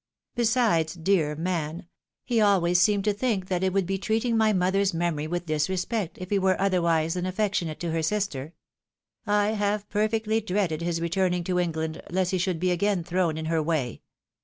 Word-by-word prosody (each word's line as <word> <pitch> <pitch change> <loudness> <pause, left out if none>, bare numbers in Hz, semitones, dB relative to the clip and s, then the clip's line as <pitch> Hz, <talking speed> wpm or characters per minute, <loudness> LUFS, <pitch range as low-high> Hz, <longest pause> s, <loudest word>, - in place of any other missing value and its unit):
Besides, 220 -9 +2
dear 165 -4 +1
man! 165 -1 -3 0.4
he 235 -3 +1
always 180 -4 +3
seemed 205 0 +3
to 210 0 +2
think 205 -4 -1
that 180 -1 0
it 190 - +2
would 195 0 +1
be 195 +2 -2
treating 225 +4 0
my 220 -1 +4
mother's 190 0 +1
memory 165 -3 -1
with 175 +2 -3
disrespect, 180 +5 -1
if 185 +1 -8
he 200 - +3
were 190 -1 +2
otherwise 170 -4 +2
than 180 0 -2
affectionate 185 -5 -1
to 170 -2 -2
her 165 0 0
sister; 160 -5 -2 0.7
I 205 0 +2
have 210 -1 -1
perfectly 220 +1 0
dreaded 185 -6 -1
his 170 -1 -1
returning 180 +1 0
to 180 +1 0
England, 160 -2 -2
lest 185 +1 0
he 185 - 0
should 175 -2 -1
be 180 +1 +1
again 185 0 +1
thrown 175 -2 0
in 160 - -4
her 160 0 +1
way. 150 -6 -2
185 Hz, 185 wpm, -26 LUFS, 165-205 Hz, 0.7 s, my